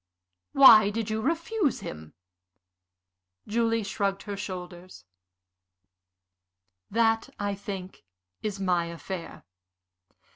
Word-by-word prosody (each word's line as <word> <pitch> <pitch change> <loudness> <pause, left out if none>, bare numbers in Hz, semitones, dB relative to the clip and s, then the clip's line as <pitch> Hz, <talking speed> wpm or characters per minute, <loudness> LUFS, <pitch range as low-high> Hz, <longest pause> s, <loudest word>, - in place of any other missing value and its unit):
"Why 220 -7 +8
did 220 0 -3
you 220 0 -1
refuse 335 - -1
him?" 75 0 -9 1.3
Julie 230 0 0
shrugged 195 0 -2
her 205 -1 -5
shoulders. 180 - -8 1.8
"That, 225 +1 +1
I 205 -1 -1
think, 195 -2 -7 0.4
is 205 -2 -4
my 180 -3 +1
affair. 170 +1 -7
200 Hz, 85 wpm, -27 LUFS, 185-225 Hz, 1.8 s, Why